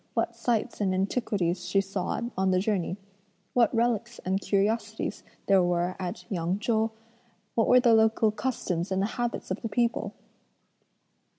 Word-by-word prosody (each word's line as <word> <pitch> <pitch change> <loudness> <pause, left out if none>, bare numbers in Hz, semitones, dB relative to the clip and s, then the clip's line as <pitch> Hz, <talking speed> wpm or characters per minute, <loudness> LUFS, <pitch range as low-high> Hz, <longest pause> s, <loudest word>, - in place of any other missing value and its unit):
what 230 0 0
sights 230 -2 -1
and 190 -2 +1
antiquities 190 -3 0
she 185 +2 +1
saw 195 -1 -2 0.2
on 190 0 +1
the 185 - +3
journey? 190 -2 0 0.6
what 235 -3 +4
relics 235 0 0
and 190 +2 0
curiosities 210 +3 -1 0.2
there 195 -1 +5
were 175 +1 0
at 180 -2 -5
Yang 180 -2 -1
Chou? 220 +1 +1 0.6
what 225 - +2
were 250 - +7
the 240 -2 +5
local 220 0 +4
customs 195 -7 -2
and 190 - +1
the 210 - -3
habits 240 -5 -2
of 185 - -2
the 225 - -3
people?" 230 -3 0
205 Hz, 155 wpm, -28 LUFS, 185-230 Hz, 0.6 s, were